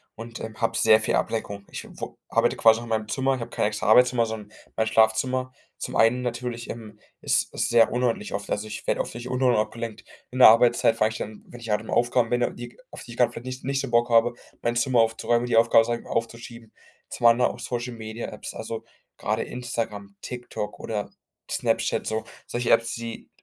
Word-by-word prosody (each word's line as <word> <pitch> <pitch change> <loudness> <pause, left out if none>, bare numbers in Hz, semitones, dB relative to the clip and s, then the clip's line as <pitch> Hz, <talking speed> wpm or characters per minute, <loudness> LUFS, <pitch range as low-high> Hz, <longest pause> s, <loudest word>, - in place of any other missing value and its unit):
und, 115 +1 -8
ähm, 110 -1 -7
habe 115 - 0
sehr 110 0 +6
viel 110 - 0
Ablenkung. 100 -3 -2
Ich, - - -6
äh, - - -14
woh - - -8
arbeite - - +1
quasi 115 0 +5
auch - - -7
in 120 - -9
meinem 110 -1 -1
Zimmer, 135 +4 0
ich - - -7
habe 115 - -6
kein - - 0
extra 105 -2 -3
Arbeitszimmer, 125 +1 +5
sondern 110 -2 -7 0.2
mein 110 - +1
Schlafzimmer. 125 +4 +2 0.2
Zum - - -5
einen 120 +3 +3
natürlich, 120 -1 -4
ähm, 110 -2 -8 0.2
ist - - +1
es - - 0
sehr 115 -1 +5
unordentlich 120 -4 -1
oft. 100 +1 -4
Also, 105 +1 -2
ich 110 - -8
werde - - +1
oft - - -6
durch 120 +1 -7
Unordnung 125 -3 +2
abgelenkt. 115 0 -6 0.3
In 130 - -5
der 125 - +11
Arbeitszeit 115 0 +4
fange 110 0 +2
ich 110 - -6
dann, 105 0 -7
wenn 120 - -12
ich 115 - -9
halt 105 0 +1
im 110 - -8
Aufgaben 120 -1 +2
bin 120 0 0
die 120 0 -9
auf - - -9
die 120 - -11
ich 120 - -10
gerade 125 - +3
vielleicht 120 - -9
nicht 130 0 -6
nicht 135 0 0
so 135 - -5
Bock 120 +1 +3
habe, 115 +1 +4 0.3
mein 120 0 0
Zimmer 120 0 +2
aufzuräumen, 120 +1 +1
die 120 - +1
Aufgabe 115 0 +6
sage 120 0 -2
ich - - -20
mal - - -10
aufzuschieben. 115 0 -5 0.4
Zum 120 - +2
anderen 120 +2 +4
auch - - -12
Social-Media-Apps, 120 -2 -6
also - - -5 0.3
gerade - - -1
Instagram, 115 -5 -5
TikTok 125 -4 -6
oder 105 -2 -4 0.4
Snapchat - - 0
so, 110 0 -1 0.2
solche 120 0 -1
Apps, 115 0 +3
die 115 -1 -7
115 Hz, 220 wpm, -25 LUFS, 110-120 Hz, 0.4 s, der